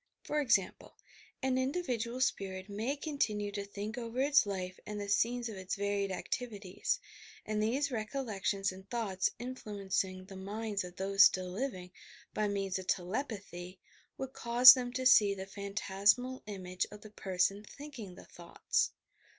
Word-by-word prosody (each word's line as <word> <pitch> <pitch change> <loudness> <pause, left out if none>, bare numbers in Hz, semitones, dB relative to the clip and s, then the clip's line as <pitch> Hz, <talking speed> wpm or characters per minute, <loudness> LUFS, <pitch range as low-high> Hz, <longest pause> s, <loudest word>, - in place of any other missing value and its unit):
For 300 0 0
example: 230 -9 0 0.5
an 260 -1 +2
individual 255 -4 -1
spirit 190 -6 -1
may 220 +7 -2
continue 225 -9 -1
to 200 0 -3
think 205 +4 -5
over 235 +1 -5
its 280 -4 +5
life 185 -2 -4
and 210 0 -5
the 205 - -4
scenes 235 +4 +1
of 215 -3 -6
its 190 0 -3
varied 200 -1 -1
activities, 210 - -3 0.5
and 215 0 -1
these 265 +6 +1
recollections 215 -5 -1
and 190 +1 -13
thoughts, 210 -6 0
influencing 200 -6 -3
the 195 0 -11
minds 205 +2 -3
of 180 0 -9
those 195 +1 +6
still 185 -1 +2
living, 185 -4 -4 0.4
by 215 -1 +1
means 195 -2 -1
of 185 - -9
telepathy, 185 -3 -3 0.4
would 265 0 -5
cause 245 +2 +9
them 245 -2 -3
to 260 0 -2
see 210 -5 +7
the 190 0 -6
phan 200 0 -7
tasmal 210 +7 +2
image 185 -3 -3
of 210 0 -11
the 215 - -12
person 195 0 0
thinking 235 -7 -9
the - - -13
thoughts. 170 -1 -1
205 Hz, 155 wpm, -33 LUFS, 190-245 Hz, 0.5 s, cause